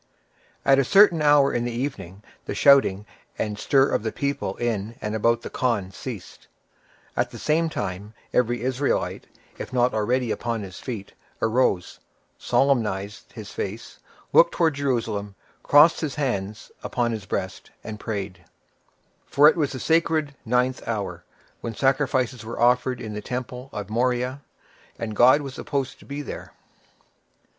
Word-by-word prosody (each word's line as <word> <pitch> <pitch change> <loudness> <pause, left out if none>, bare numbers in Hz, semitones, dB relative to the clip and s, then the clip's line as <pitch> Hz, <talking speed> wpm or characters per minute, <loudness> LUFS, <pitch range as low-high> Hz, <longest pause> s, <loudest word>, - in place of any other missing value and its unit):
At 135 0 +5
a - - +4
certain 180 +2 +5
hour 145 -2 +5
in 120 - 0
the 120 - -2
evening 105 -7 -5 0.2
the - - -4
shouting 135 -8 +5 0.3
and 105 -1 -3
stir 135 -1 +4
of - - 0
the 110 0 -2
people 140 0 -2
in 115 -2 -2
and 105 0 -4
about 115 +2 +1
the - - -5
khan 110 -7 -1
ceased; 105 -1 -9 0.7
at - - 0
the - - -10
same 160 +2 +1
time, 100 -4 -5 0.2
every 120 -1 +1
Israelite, 130 +2 -1 0.3
if - - -6
not 125 0 +2
already 120 +2 0
upon 115 -3 -2
his 95 -2 -9
feet, 110 -6 -6 0.3
arose, 110 -6 +1 0.4
solemnized 105 -7 0
his 110 -3 -9
face, 110 +4 -6 0.3
looked 170 - +6
towards 160 -5 +1
Jerusalem, 110 -7 -1 0.3
crossed 150 +3 +6
his 150 -4 -3
hands 110 -7 -3
upon 120 -1 -1
his 105 -3 -5
breast, 95 0 -4
and 110 -1 -7
prayed; 100 -5 -5 0.8
for 145 +2 +6
it - - +5
was 150 -5 0
the 130 - -5
sacred 160 -2 +1
ninth 125 +2 +1
hour, 100 -6 -3 0.4
when 115 -1 -5
sacrifices 130 -3 +1
were 115 +1 -7
offered 125 +1 +3
in 110 -1 -6
the 105 - -5
temple 125 +2 -5
on 105 - -5
Moriah, 125 +4 0 0.6
and 110 -2 -4
God 130 +6 +6
was 135 -2 -6
supposed 140 -1 -3
to - - -16
be 145 +1 -5
there. - - -8
120 Hz, 150 wpm, -24 LUFS, 105-135 Hz, 0.8 s, looked